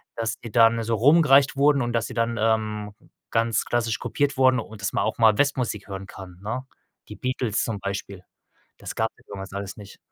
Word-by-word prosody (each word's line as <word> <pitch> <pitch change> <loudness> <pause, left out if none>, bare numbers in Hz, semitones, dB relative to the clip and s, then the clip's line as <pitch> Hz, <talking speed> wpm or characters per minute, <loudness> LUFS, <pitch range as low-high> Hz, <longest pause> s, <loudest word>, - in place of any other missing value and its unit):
dass 115 -1 -3
die 115 - -9
dann 115 0 +4
so 115 0 0
rumgereicht 140 +2 +5
wurden 140 0 +4
und 120 0 -2
dass 115 - 0
sie - - -8
dann, 115 0 -1
ähm, 110 -2 0 0.4
ganz 115 -1 +1
klassisch 115 -2 0
kopiert 145 -2 -1
wurden 130 -1 +4
und 110 -2 -9
dass 100 - -1
man - - +1
auch - - -2
mal 110 -2 +5
Westmusik 125 -8 0
hören 95 0 -6
kann, 90 -2 -11
ne? 125 +5 -4 0.4
Die - - -8
Beatles 125 -4 -1
zum 110 -3 -3
Beispiel. 100 -1 -5 0.5
Das - - -7
gab's 110 0 -1
ja - - -23
damals 95 -1 -8
alles 100 0 -6
nicht. 100 -2 -12
115 Hz, 200 wpm, -24 LUFS, 105-125 Hz, 0.5 s, rumgereicht